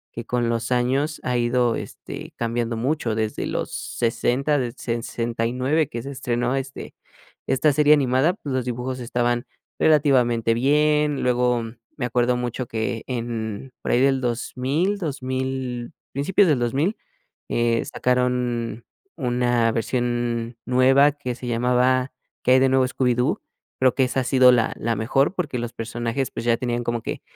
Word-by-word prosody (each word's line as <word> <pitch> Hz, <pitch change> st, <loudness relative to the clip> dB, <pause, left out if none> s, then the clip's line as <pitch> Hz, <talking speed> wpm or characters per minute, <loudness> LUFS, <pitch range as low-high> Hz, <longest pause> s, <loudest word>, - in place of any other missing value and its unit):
que 115 Hz, -, -5 dB
con 120 Hz, -1 st, 0 dB
los 115 Hz, +1 st, -2 dB
años 135 Hz, +5 st, +1 dB
ha 125 Hz, -1 st, 0 dB
ido 120 Hz, 0 st, +2 dB
este -, -, -8 dB
cambiando 115 Hz, 0 st, -2 dB
mucho 125 Hz, -2 st, -1 dB
desde 110 Hz, -1 st, -2 dB
los -, -, -3 dB, 0.3 s
sesentas, 125 Hz, +5 st, +1 dB
del 120 Hz, -2 st, -3 dB
69 120 Hz, +5 st, -1 dB
que 115 Hz, 0 st, -5 dB
se 140 Hz, -, -6 dB
estrenó 125 Hz, -1 st, -1 dB
este 135 Hz, 0 st, -5 dB, 0.5 s
esta 135 Hz, +3 st, +3 dB
serie 150 Hz, +1 st, +5 dB
animada, 135 Hz, +4 st, +2 dB
pues, 145 Hz, -9 st, -6 dB
los 130 Hz, -, 0 dB
dibujos 125 Hz, +1 st, -3 dB
estaban 120 Hz, 0 st, -1 dB, 0.3 s
relativamente 125 Hz, -7 st, +3 dB
bien, 150 Hz, +3 st, +2 dB
luego 125 Hz, -1 st, +2 dB, 0.3 s
me 125 Hz, -, -1 dB
acuerdo 125 Hz, +1 st, +1 dB
mucho 125 Hz, 0 st, -3 dB
que 110 Hz, 0 st, -3 dB
en, 115 Hz, -1 st, -4 dB
por -, -, -2 dB
ahí 120 Hz, -, +3 dB
del 135 Hz, -1 st, +3 dB
2,000, 130 Hz, -, -1 dB
2,000, 130 Hz, -4 st, -3 dB, 0.2 s
principios 180 Hz, +8 st, +3 dB
del 145 Hz, -6 st, +3 dB
2000, 140 Hz, -, 0 dB, 0.5 s
eh, 115 Hz, -1 st, +1 dB
sacaron 125 Hz, -2 st, -1 dB, 0.3 s
una 120 Hz, -3 st, +1 dB
versión 120 Hz, 0 st, -1 dB
nueva 135 Hz, +3 st, +5 dB
que 135 Hz, -4 st, -4 dB
se 125 Hz, 0 st, -8 dB
llamaba, 125 Hz, +2 st, +2 dB, 0.3 s
Qué 125 Hz, -, +3 dB
hay 130 Hz, -, +6 dB
de 135 Hz, 0 st, +4 dB
nuevo 130 Hz, -1 st, +3 dB
Scooby-Doo, 125 Hz, -1 st, +1 dB, 0.4 s
creo 130 Hz, -1 st, +3 dB
que 130 Hz, -, +3 dB
esa 130 Hz, +1 st, 0 dB
ha -, -, -2 dB
sido 130 Hz, 0 st, +6 dB
la 115 Hz, -2 st, +2 dB
la 115 Hz, 0 st, 0 dB
mejor 135 Hz, -, +1 dB
porque, 145 Hz, -9 st, -2 dB
los 120 Hz, 0 st, -4 dB
personajes, 120 Hz, +3 st, -3 dB
pues, 115 Hz, -, -6 dB
ya 115 Hz, -, +4 dB
tenían 120 Hz, -1 st, -2 dB
como 120 Hz, 0 st, -2 dB
que -, -, -4 dB
125 Hz, 155 wpm, -23 LUFS, 120-135 Hz, 0.5 s, hay